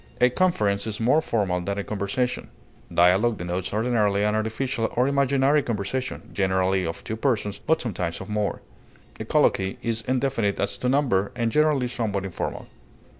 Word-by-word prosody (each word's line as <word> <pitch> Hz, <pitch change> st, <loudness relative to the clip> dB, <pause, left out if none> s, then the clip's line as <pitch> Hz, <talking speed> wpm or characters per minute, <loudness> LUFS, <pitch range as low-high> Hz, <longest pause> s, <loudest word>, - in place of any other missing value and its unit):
A 125 Hz, 0 st, +5 dB
conference 105 Hz, -, +1 dB
is 105 Hz, -1 st, -4 dB
more 130 Hz, +8 st, +3 dB
formal 100 Hz, -, 0 dB
than 100 Hz, +3 st, -3 dB
a 100 Hz, -, -2 dB
conversation. 105 Hz, +5 st, -2 dB, 0.4 s
Dialog 95 Hz, +6 st, +4 dB
denotes 90 Hz, +2 st, -3 dB
ordinarily 105 Hz, -2 st, +1 dB
an 105 Hz, 0 st, +2 dB
artificial 110 Hz, +2 st, -1 dB
or 125 Hz, +2 st, +3 dB
imaginary 140 Hz, +1 st, +3 dB
conversation, 120 Hz, +3 st, -4 dB
generally 95 Hz, -1 st, +1 dB
of 80 Hz, -, -6 dB
two 110 Hz, -, -4 dB
persons, 110 Hz, -4 st, -1 dB
but 160 Hz, 0 st, +1 dB
sometimes 90 Hz, -7 st, -3 dB
of -, -, -8 dB
more. 105 Hz, -1 st, -2 dB, 0.6 s
A -, -, -4 dB
colloquy 95 Hz, 0 st, +2 dB
is 115 Hz, -1 st, -1 dB
indefinite 125 Hz, -5 st, 0 dB
as -, -, 0 dB
to 125 Hz, -, 0 dB
number, 125 Hz, -8 st, +2 dB
and 115 Hz, -1 st, 0 dB
generally 150 Hz, -3 st, +2 dB
somewhat 105 Hz, -5 st, -2 dB
informal. 95 Hz, -, -4 dB
110 Hz, 160 wpm, -25 LUFS, 100-125 Hz, 0.6 s, A